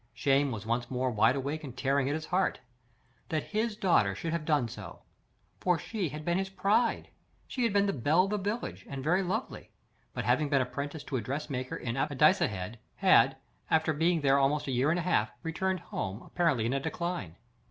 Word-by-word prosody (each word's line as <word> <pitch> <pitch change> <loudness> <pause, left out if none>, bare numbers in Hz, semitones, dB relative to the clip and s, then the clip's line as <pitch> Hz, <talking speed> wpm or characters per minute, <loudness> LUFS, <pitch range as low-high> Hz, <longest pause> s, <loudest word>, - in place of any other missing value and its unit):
Shame 135 +2 +2
was 110 -2 -5
once 120 +1 -1
more 130 0 0
wide 110 +3 +4
awake 140 +3 -3
and 130 -3 -8
tearing 135 0 +1
at 145 - 0
his 155 0 -4
heart. 185 +3 0 0.7
That 155 -2 -1
HIS 215 +1 -1
daughter 115 - +2
should 165 - -3
have 170 -2 -2
done 150 -6 +2
so! - - -10 0.6
For 180 -2 +2
she 190 +1 -3
had 150 +2 -7
been 175 +2 +1
his 195 0 -2
pride. 200 +5 +1 0.4
She 250 -2 -1
had 230 - +2
been 200 0 +3
the 200 - 0
belle 145 +8 +3
of 195 - -2
the 210 - 0
village, 205 +5 -3
and 135 -1 -5
very 175 +6 +3
lovely; 200 +7 -3 0.5
but - - -3
having 150 -2 +2
been 140 -1 +3
apprenticed 140 +4 -4
to 135 - 0
a - - -2
dressmaker 130 +1 -4
in 115 +1 -4
Addicehead, 130 - +2 0.2
had, - - +5 0.3
after 160 0 +2
being 165 +2 +2
there 140 0 +4
about 145 +2 +2
a 135 - -3
year 130 +3 +2
and 170 - +2
a 175 - -1
half, 135 -12 +2
returned 185 +2 -1
home, 100 - -5
apparently 160 -10 +1
in 120 - 0
a 140 - +1
decline. 170 - -4
150 Hz, 205 wpm, -30 LUFS, 130-180 Hz, 0.7 s, had